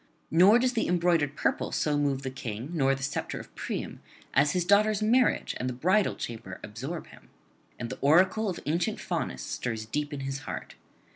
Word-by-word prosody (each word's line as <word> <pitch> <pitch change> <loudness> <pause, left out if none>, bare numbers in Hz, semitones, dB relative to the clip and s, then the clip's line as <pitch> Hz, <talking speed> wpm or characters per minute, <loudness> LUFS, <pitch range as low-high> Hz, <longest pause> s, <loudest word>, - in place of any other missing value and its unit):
Nor 185 +7 +7
does 250 +1 +1
the 230 - 0
embroidered 170 -5 +2
purple - - 0
so 150 -1 +1
move 140 -2 0
the 130 - -3
King, 120 +1 -6
nor 135 -4 +2
the 135 - -7
sceptre 140 - -3
of - - -12
Priam, - - -5 0.3
as 140 +1 +4
his 180 -2 0
daughter's 210 +2 +4
marriage 245 +4 +3
and 130 - -1
the - - -3
bridal 185 +11 +2
chamber 110 -5 -6
absorb 135 +11 -6
him, - - -17 0.5
and 120 -1 -5
the - - -6
oracle 185 +9 +4
of 180 - -4
ancient 165 +4 0
Faunus - - -3
stirs 115 -3 -3
deep 145 +6 -2
in 145 -2 -5
his 135 0 -3
heart. 140 - -6
150 Hz, 190 wpm, -28 LUFS, 135-185 Hz, 0.5 s, Nor